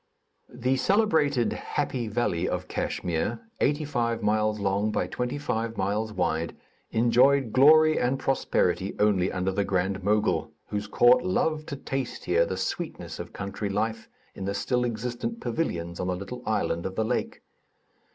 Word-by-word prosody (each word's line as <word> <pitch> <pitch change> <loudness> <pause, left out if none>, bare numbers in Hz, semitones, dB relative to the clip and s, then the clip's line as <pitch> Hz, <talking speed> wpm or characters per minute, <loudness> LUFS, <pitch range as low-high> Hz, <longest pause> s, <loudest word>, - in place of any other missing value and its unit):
The 125 +2 0
celebrated 155 - +2
"happy 130 -5 -2
valley" 105 -6 0
of - - -3
Kachmyr 85 -2 -2 0.2
(eighty 150 +2 +1
five 120 -5 -1
miles 105 0 +1
long 100 +2 0
by - - 0
twenty 125 +3 -3
five 115 -5 -2
miles 105 +3 -1
wide) 85 -4 -1 0.3
enjoyed 120 +2 +3
glory 155 +3 +6
and 125 +2 +1
prosperity 135 0 0
only 100 -3 +2
under 90 +1 -1
the 100 +1 0
Grand 95 0 -1
Mogul, 100 -6 +1 0.2
whose 105 0 -3
court 120 +4 +5
loved 155 +11 0
to 140 - -3
taste 135 -2 -4
here 85 -1 +3
the 95 - -3
sweetness 95 - -4
of - - -6
country 100 +1 -4
life, 110 +3 -2 0.2
in 95 - -7
the 100 +1 -2
still 125 +5 0
existent 120 - -3
pavilions 85 - -3
on 90 - -2
the 90 - 0
little 100 +7 -7
island 95 -5 0
of 95 - -7
the 110 - 0
lake. - - -2
110 Hz, 155 wpm, -27 LUFS, 95-130 Hz, 0.3 s, glory